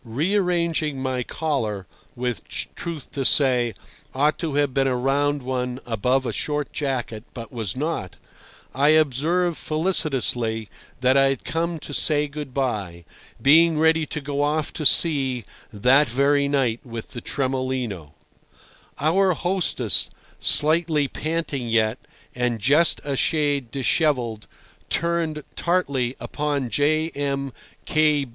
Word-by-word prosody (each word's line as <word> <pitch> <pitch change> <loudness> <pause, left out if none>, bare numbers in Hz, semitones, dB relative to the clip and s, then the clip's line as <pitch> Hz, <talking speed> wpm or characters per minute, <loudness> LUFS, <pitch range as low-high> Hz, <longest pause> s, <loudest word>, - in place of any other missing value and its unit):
Rearranging 165 - 0
my 130 -1 -2
collar, 115 -9 -2 0.3
which, 125 -2 -4
truth 165 -5 -6
to 140 - -3
say, 125 -4 +3 0.4
ought 145 +3 +2
to 160 -5 -3
have 145 -2 +1
been 135 0 +2
a 130 - +1
round 140 +2 0
one 125 0 -3
above 125 +4 0
a - - -2
short 150 -1 -2
jacket, 125 -6 -3
but 115 -2 -8
was 110 -4 -3
not, 145 - -3 0.6
I 140 +3 +3
observed 160 +4 +1
felicitously 130 - 0 0.3
that 130 +1 +4
I 135 - +5
had 135 -2 -3
come 165 +5 -2
to 145 - -7
say 150 0 +2
good 145 -1 -7
bye, 105 -11 -3 0.3
being 160 +3 +5
ready 160 0 +3
to 150 - -4
go 140 0 -3
off 150 +1 0
to 155 - +3
sea 135 - +1 0.3
that 130 +7 +4
very 140 +4 +2
night 130 -5 +1
with 115 -2 -8
the 120 - -7
Tremolino. 130 - -3 0.9
Our 185 +5 +3
hostess, 180 +2 +1 0.3
slightly 155 -1 +4
panting 155 -6 -3
yet, 110 +1 +1 0.3
and 125 -1 -1
just 145 +9 +3
a 140 -1 -2
shade 145 -4 0
dishevelled, 125 -3 0 0.4
turned 165 -2 -1
tartly 140 -8 0
upon 145 -5 -2
J. 155 +6 +2
M. 140 -2 -3
140 Hz, 125 wpm, -23 LUFS, 125-155 Hz, 0.9 s, I